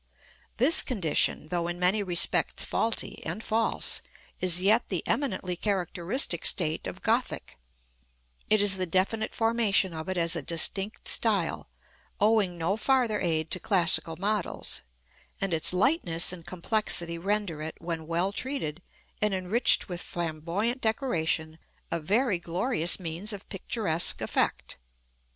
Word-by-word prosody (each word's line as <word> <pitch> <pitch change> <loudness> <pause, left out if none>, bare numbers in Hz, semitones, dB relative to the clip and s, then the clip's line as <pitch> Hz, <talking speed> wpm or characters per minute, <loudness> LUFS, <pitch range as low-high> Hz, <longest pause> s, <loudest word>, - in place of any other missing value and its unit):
This 270 +8 +7
condition, 165 - 0
though 170 -1 -1
in 175 0 -4
many 180 +4 +2
respects 175 -3 +2
faulty 225 0 -2
and 220 - -5
false, 225 0 +1 0.4
is 180 -1 +4
yet 215 +5 +2
the 180 -4 -2
eminently 185 -10 -1
characteristic 180 - -1
state 160 -3 0
of - - -8
Gothic: - - -1 0.9
it 215 -1 +4
is 195 -1 +7
the 185 -1 -1
definite 195 +5 -1
formation 225 -5 +1
of 160 +3 -6
it 185 - -2
as 170 0 +2
a - - -2
distinct 195 +5 0
style, - - +1 0.5
owing 210 -4 +2
no 170 +5 -1
farther 245 -3 +1
aid 160 -2 -1
to 185 - 0
classical 170 -4 +2
models; 205 0 -2 0.6
and 195 -3 -1
its 160 -2 +1
lightness 180 - +1
and 170 -2 -12
complexity 175 -2 0
render 195 -4 -2
it, 160 +1 -5
when 165 -2 -5
well 170 +4 0
treated, 205 - -4 0.4
and 210 -2 +1
enriched 190 +6 +2
with 175 -1 -5
Flamboyant 175 - -3
decoration, 165 - -1 0.3
a 170 - -1
very 205 - +1
glorious 175 +1 +1
means 175 +4 -5
of 200 -2 -9
picturesque 185 -4 +1
effect. - - -1
185 Hz, 135 wpm, -27 LUFS, 170-215 Hz, 0.9 s, This